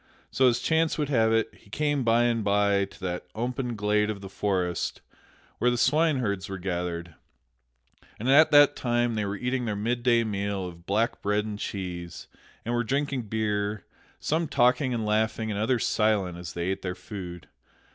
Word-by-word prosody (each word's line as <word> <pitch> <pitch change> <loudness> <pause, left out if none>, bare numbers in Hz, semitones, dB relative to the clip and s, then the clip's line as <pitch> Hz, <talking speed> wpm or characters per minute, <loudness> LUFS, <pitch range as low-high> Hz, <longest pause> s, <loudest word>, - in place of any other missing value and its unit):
So, 130 - +4
as 120 -1 +3
chance 160 0 +1
would 150 -2 -1
have 115 -5 +3
it, 115 0 +1
he 105 - -21
came 145 +3 0
by 115 0 +4
and 115 -2 +1
by 100 -1 +2
to 95 - -16
that 90 -1 -4
open 125 +1 -2
glade 105 0 +1
of 105 -2 -3
the 95 0 -9
forest 90 -4 -1 0.6
where 125 - +3
the 120 - 0
swineherds 130 - +1
were 95 - -4
gathered; 85 -2 -3 1.1
and 115 - -3
at 155 +4 +7
that 145 -1 +6
time 120 -1 0
they 105 -2 -1
were 100 0 -3
eating 125 +2 -1
their 105 -2 -2
midday 120 +2 +2
meal 100 -2 -2
of 85 0 -12
black 110 +4 0
bread 105 +1 0
and 105 -1 -5
cheese, 90 -4 -5 0.4
and 120 - -1
were 120 0 +1
drinking 135 -1 -1
beer; 105 -1 -1 0.3
some 160 +2 0
talking 130 +1 +2
and 115 -3 -1
laughing 110 +1 0
and 100 - -2
others 115 +2 +1
silent 105 -5 +1
as 85 -2 -7
they 85 +1 -2
ate 95 - -2
their 90 -1 -3
food. 90 -2 -8
110 Hz, 180 wpm, -27 LUFS, 100-120 Hz, 1.1 s, at